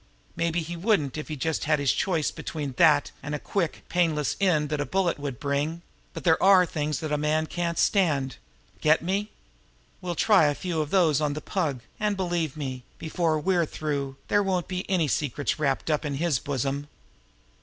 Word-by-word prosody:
Maybe 170 0 0
he 170 +2 -5
wouldn't 170 - +1
if 155 - -5
he 155 - -4
just 160 +3 -1
had 155 0 +3
his 140 -2 +2
choice 165 -6 0
between 145 -4 -5
that 150 -4 +5
and 145 +1 -4
the - - -4
quick, 175 -1 -2
painless 160 -4 +1
end 155 -6 +2
that 150 -1 -1
a - - -1
bullet 185 -5 0
would 140 -4 -5
bring; 145 +4 -1 0.3
but - - -6
there 160 -3 +3
are 190 -1 +7
some - - -15
things 150 0 -1
that 155 -1 -3
a 150 - +1
man 155 +1 +1
can't 170 +1 -2
stand. 145 -10 +2 0.4
Get 155 +1 +3
me? 200 +4 -1 0.7
We'll 175 -1 -3
try 205 -2 +5
a 145 -1 +2
few 170 -2 -2
of 150 - -3
those 160 -6 +3
on 150 -1 +1
the 150 - -4
Pug, 155 - -2 0.2
and, 210 -1 0
believe 175 -5 -1
me, 130 -4 -4 0.2
before 160 -1 0
we're 175 0 +1
through, 140 -4 -3
there 205 - +3
won't 185 -3 0
be 185 0 -4
any 175 -5 +2
secrets 145 +1 -1
wrapped 140 +1 0
up 150 +1 +1
in 145 -2 -2
his 155 -3 +1
bosom." 140 +1 -2
155 Hz, 195 wpm, -26 LUFS, 145-175 Hz, 0.7 s, are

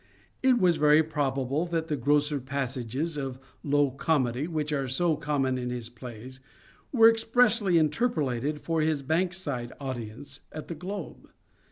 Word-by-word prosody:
It 260 -1 +5
is 175 -3 +4
very 150 +1 +5
probable 145 0 -1
that 165 -1 -2
the 150 - -1
grosser 145 +2 +2
passages 135 +3 -3
of 135 -3 -4 0.2
low 145 -1 +2
comedy 135 -1 0
which 155 -3 -2
are 135 -2 -1
so 160 +6 +1
common 140 -4 -1
in 125 0 -3
his 120 -1 -4
plays 125 +1 -10 0.5
were 225 -4 +7
expressly 225 -4 +3
interpolated 150 - 0
for 165 -1 0
his 155 -2 0
Bankside 160 -6 -1
audience 130 0 -6
at 155 - -8
The - - -3
Globe. 185 +2 -7
145 Hz, 145 wpm, -28 LUFS, 130-165 Hz, 0.5 s, were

